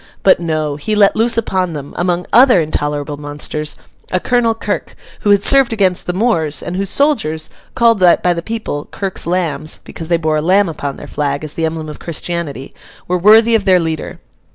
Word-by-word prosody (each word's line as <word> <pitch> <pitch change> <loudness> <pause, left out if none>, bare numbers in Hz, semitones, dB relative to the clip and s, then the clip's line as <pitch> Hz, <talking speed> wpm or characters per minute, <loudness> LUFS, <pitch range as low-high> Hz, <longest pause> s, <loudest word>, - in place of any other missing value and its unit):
But 190 - +5
no; 155 -3 -2
he 210 +9 -2
let 205 -1 +4
loose 230 +1 +2
upon 185 -6 -1
them, 145 -2 -7
among 175 0 -1
other 245 -4 +6
intolerable 145 -2 -2
monsters, 150 +1 -4 0.4
a 185 - +1
Colonel 235 +1 +1
Kirk, - - -4 0.2
who 205 - -1
had 200 -1 +4
served 275 -3 +4
against 190 -4 0
the 180 - -1
Moors, 170 -8 0
and 175 - -5
whose 195 0 -2
soldiers—called 230 - 0
by 180 0 +4
the 170 - -4
people 220 -8 -4
Kirk's 195 -4 -2
lambs, 160 -4 -2
because 165 - -9
they 170 0 +2
bore 155 -2 0
a - - 0
lamb 190 +5 +3
upon 145 -3 -5
their - - -10
flag, 145 0 -2
as 155 -1 -6
the 165 - -1
emblem 160 -1 -5
of 150 - -8
Christianity—were 170 +1 -5
worthy 220 +5 +6
of 220 -3 +2
their 185 -2 +5
leader. 160 -2 -4
175 Hz, 185 wpm, -16 LUFS, 155-205 Hz, 0.4 s, other